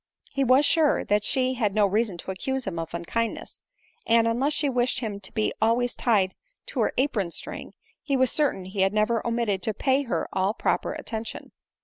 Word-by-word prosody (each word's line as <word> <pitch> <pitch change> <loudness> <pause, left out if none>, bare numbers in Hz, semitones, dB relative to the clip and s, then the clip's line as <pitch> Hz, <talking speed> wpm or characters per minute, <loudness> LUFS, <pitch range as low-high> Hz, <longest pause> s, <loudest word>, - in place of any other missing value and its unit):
He 275 0 0
was 260 +3 +5
sure 310 -1 +3
that 205 0 +2
she 260 +1 +1
had 215 -5 -1
no 210 -1 +4
reason 205 -1 0
to 190 - -6
accuse 265 +7 -3
him 180 -4 -3
of 165 -1 -5
unkindness; 225 +7 -3 0.5
and, 230 0 +4
unless 260 +6 +1
she 295 - +1
wished 250 -2 +1
him 210 -4 -4
to 190 - -7
be 215 - 0
always 235 +2 +2
tied 200 -6 +2 0.4
to - - -4
her - - +2
apron 235 -9 +1
string, - - -6 0.3
he 275 -2 0
was 260 -2 +3
certain 280 -11 +1
he 190 +1 -3
had 195 +1 +3
never 215 +1 +1
omitted 230 -5 0
to 220 - -2
pay 265 +3 +2
her 250 -5 -2
all 190 +3 +1
proper - - 0
attention. 220 -1 -6
230 Hz, 200 wpm, -26 LUFS, 200-260 Hz, 0.5 s, was